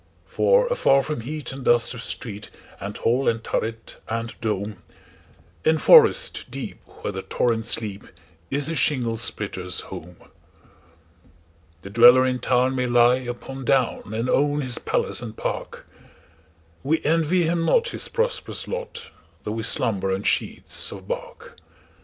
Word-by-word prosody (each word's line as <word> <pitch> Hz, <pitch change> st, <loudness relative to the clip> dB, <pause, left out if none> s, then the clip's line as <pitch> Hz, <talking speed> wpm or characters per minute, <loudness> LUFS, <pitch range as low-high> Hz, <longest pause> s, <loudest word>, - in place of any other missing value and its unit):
For -, -, +3 dB
afar 140 Hz, -, +3 dB
from 150 Hz, -5 st, -4 dB
heat 150 Hz, +5 st, -6 dB
and 135 Hz, 0 st, -8 dB
dust 120 Hz, 0 st, +3 dB
of 125 Hz, -, -7 dB
street, 105 Hz, -3 st, -4 dB, 0.3 s
And 100 Hz, +1 st, -6 dB
hall 125 Hz, +4 st, +1 dB
and 115 Hz, -1 st, -2 dB
turret, 115 Hz, 0 st, -4 dB
and 115 Hz, +1 st, -3 dB
dome, 105 Hz, -2 st, -2 dB, 0.9 s
In 160 Hz, 0 st, +3 dB
forest 455 Hz, -, +5 dB
deep, -, -, -7 dB, 0.2 s
where -, -, -2 dB
the -, -, -5 dB
torrents 115 Hz, -2 st, +1 dB
leap, 105 Hz, -3 st, -7 dB, 0.4 s
Is 140 Hz, +1 st, 0 dB
the 165 Hz, -, -1 dB
shingle 125 Hz, -8 st, +1 dB
splitter's 100 Hz, -5 st, -1 dB
home. 90 Hz, +2 st, -10 dB, 1.7 s
The 100 Hz, -, -9 dB
dweller 120 Hz, +3 st, +7 dB
in 125 Hz, -1 st, 0 dB
town 130 Hz, +1 st, +1 dB
may 125 Hz, -1 st, 0 dB
lie 120 Hz, +1 st, +5 dB
upon 130 Hz, +1 st, -7 dB
down, 125 Hz, -5 st, 0 dB
And 115 Hz, +3 st, -1 dB
own 145 Hz, +3 st, +2 dB
his 125 Hz, -3 st, -1 dB
palace -, -, -1 dB
and 115 Hz, -2 st, -8 dB
park:We 80 Hz, -, -6 dB
envy 165 Hz, +3 st, +2 dB
him 165 Hz, +1 st, 0 dB
not 475 Hz, -, +3 dB
his -, -, -3 dB
prosperous 475 Hz, 0 st, -2 dB
lot, -, -, -6 dB, 0.3 s
Though 105 Hz, -, -4 dB
we 110 Hz, +1 st, -3 dB
slumber 100 Hz, -3 st, 0 dB
on 95 Hz, +1 st, -2 dB
sheets -, -, -1 dB
of -, -, -10 dB
bark. -, -, -7 dB
120 Hz, 145 wpm, -23 LUFS, 110-145 Hz, 1.7 s, dweller